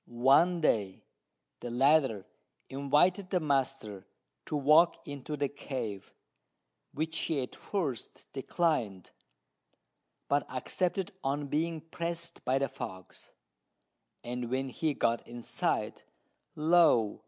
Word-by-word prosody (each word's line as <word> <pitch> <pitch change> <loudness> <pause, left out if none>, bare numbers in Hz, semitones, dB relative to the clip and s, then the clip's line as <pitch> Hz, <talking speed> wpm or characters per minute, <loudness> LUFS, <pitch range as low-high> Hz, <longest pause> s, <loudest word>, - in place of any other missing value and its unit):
One 140 +9 +4
day 100 -10 +1 0.6
the 120 - -6
latter 135 -4 +3 0.4
invited 150 +8 +2
the 185 - +2
master 135 - -1 0.4
to - - -2
walk 150 +4 +5
into 145 +1 -5
the 145 0 +1
cave, 125 -8 -6 0.8
which 160 +2 -2
he 150 -5 0
at 125 - -8
first 155 - -4
declined, 135 - -1 1.2
but 140 -3 0
accepted 180 +9 -1
on 140 +1 -1
being 160 +2 -1
pressed 170 +1 -4
by 130 +1 +2
the 135 0 +1
fox; 95 -5 -9 0.9
and 120 0 -4
when 130 +1 -1
he 150 +3 -1
got 115 0 0
inside, 120 0 -2 0.5
lo! 155 -9 +4
140 Hz, 110 wpm, -31 LUFS, 120-160 Hz, 1.2 s, walk